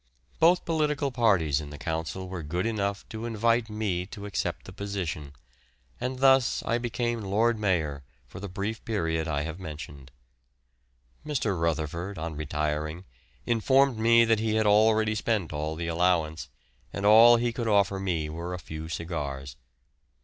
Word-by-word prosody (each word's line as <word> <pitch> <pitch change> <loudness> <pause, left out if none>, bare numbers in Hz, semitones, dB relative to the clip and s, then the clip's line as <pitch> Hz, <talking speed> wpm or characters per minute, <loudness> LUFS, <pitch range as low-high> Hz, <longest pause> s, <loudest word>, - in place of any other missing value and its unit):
Both 170 +2 +4
political 150 -3 0
parties 95 - +2
in 75 - -8
the 75 - -9
Council 80 +4 -4
were 90 -2 -5
good 85 +5 -2
enough 100 -3 -2
to 110 +1 -5
invite 115 +1 +1
me 100 -5 -2
to 100 -1 -9
accept 100 - -3
the 95 - -10
position, 95 -8 -4 0.7
and 130 +1 -3
thus 135 -1 +4
I 115 - 0
became 120 -1 -2
Lord 110 +3 +1
Mayor 80 -9 0 0.2
for 65 - -11
the 100 0 -6
brief 105 +4 -4
period 80 -7 -1
I 75 -2 -1
have 80 +3 -6
mentioned. 75 -5 -8 1.1
Mr. 125 -9 -1
Rutherford, 85 +3 -2
on 80 0 -4
retiring, 75 +2 -2 0.4
informed 130 +2 +3
me 115 +1 +5
that 115 -1 +3
he 110 0 0
had 110 0 +2
already 110 +1 +4
spent 105 -6 -1
all 75 +1 -3
the 85 +1 -4
allowance, 80 -4 0 0.4
and 100 - -4
all 115 +3 +8
he 120 0 0
could 120 -1 -3
offer 100 -2 +2
me 85 -5 -1
were 85 +3 -5
a - - -5
few 80 -2 -8
cigars. 70 -6 -4
100 Hz, 155 wpm, -27 LUFS, 80-115 Hz, 1.1 s, all